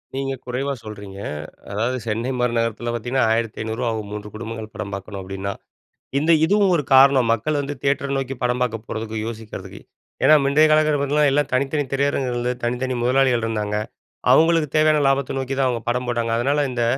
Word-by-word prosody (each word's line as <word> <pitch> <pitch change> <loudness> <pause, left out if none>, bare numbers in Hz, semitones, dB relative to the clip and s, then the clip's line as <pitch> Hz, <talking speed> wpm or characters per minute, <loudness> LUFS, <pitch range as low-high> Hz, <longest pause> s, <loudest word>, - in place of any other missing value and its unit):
நீங்க 135 0 -2
குறைவா 130 +3 -2
சொல்றீங்க. 100 -2 -9 0.5
அதாவது 115 +5 -1
சென்னை 115 +3 -2
மாரி 125 -1 +1
நகரத்தில 115 +1 -1
பார்த்தீங்கன்னா 120 +3 0
ரூ.1500 115 0 -2
ஆகும், 110 -2 -5
3 105 0 -6
குடும்பங்கள் 110 0 -7
படம் 100 -2 -6
பார்க்கணும் 100 +1 -6
அப்படின்னா. 95 +1 -4 0.7
இந்த 155 +4 +3
இதுவும் 200 +2 +3
ஒரு 150 - +1
காரணம். 135 -2 +6
மக்கள் 145 +7 0
வந்து 145 +1 -4
தியேட்டரை 140 0 0
நோக்கி 135 0 -3
படம் 125 0 0
பார்க்க 115 -2 -1
போறதுக்கு, 110 0 -4
யோசிக்கிறதுக்கு. 110 -2 -8 0.4
ஏன்னா 155 - +8
முந்தைய 145 +3 +5
காலகட்டத்துல 155 -1 +3
பாத்தீங்கன்னா 150 +2 +2
எல்லா 145 +2 +3
தனித்தனி 140 +3 +1
திரையரங்குகள் 135 -2 0
இருந்தது, 125 +1 -2
தனித்தனி 125 +2 -1
முதலாளிகள் 125 -1 +2
இருந்தாங்க. 105 -2 -2 0.6
அவங்களுக்கு 165 -1 +4
தேவையான 155 0 +4
லாபத்தை 135 -1 +1
நோக்கிதான் 135 0 -1
அவங்க 120 -2 -1
படம் 125 +1 0
போட்டாங்க. 120 -1 -1
அதனால 140 +4 +1
இந்த, 120 -2 -1
125 Hz, 165 wpm, -22 LUFS, 115-140 Hz, 0.7 s, ஏன்னா